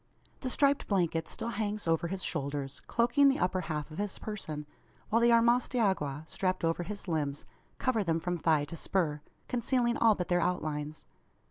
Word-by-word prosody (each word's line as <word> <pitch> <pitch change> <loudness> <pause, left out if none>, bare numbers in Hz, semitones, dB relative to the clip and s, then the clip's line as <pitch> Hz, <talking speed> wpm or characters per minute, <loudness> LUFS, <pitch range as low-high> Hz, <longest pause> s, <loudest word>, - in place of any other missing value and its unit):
The 260 - -3
striped 280 +2 +2
blanket 170 -5 +1
still 230 - -4
hangs 210 -2 -2
over 165 +1 +2
his 185 +1 -4
shoulders, 140 -2 -3
cloaking 260 +4 +4
the 270 - +2
upper 185 +1 +1
half 155 -3 -4
of 155 - -7
his 205 -1 -2
person; 155 -9 -5 0.4
while 230 +2 +3
the 235 0 +5
armas 235 +1 +4
de 250 - -2
agua, 155 - 0
strapped 185 +2 -1
over 165 +1 +1
his 200 +3 -6
limbs, 145 -4 -2 0.3
cover 250 -5 +1
them 165 -2 +1
from 175 +1 -2
thigh 155 -3 +3
to 165 - -7
spur, 160 -3 -1 0.3
concealing 240 0 +1
all 225 -2 +5
but 180 - -3
their 175 0 +2
outlines. 155 -3 -2
180 Hz, 180 wpm, -31 LUFS, 155-230 Hz, 0.4 s, the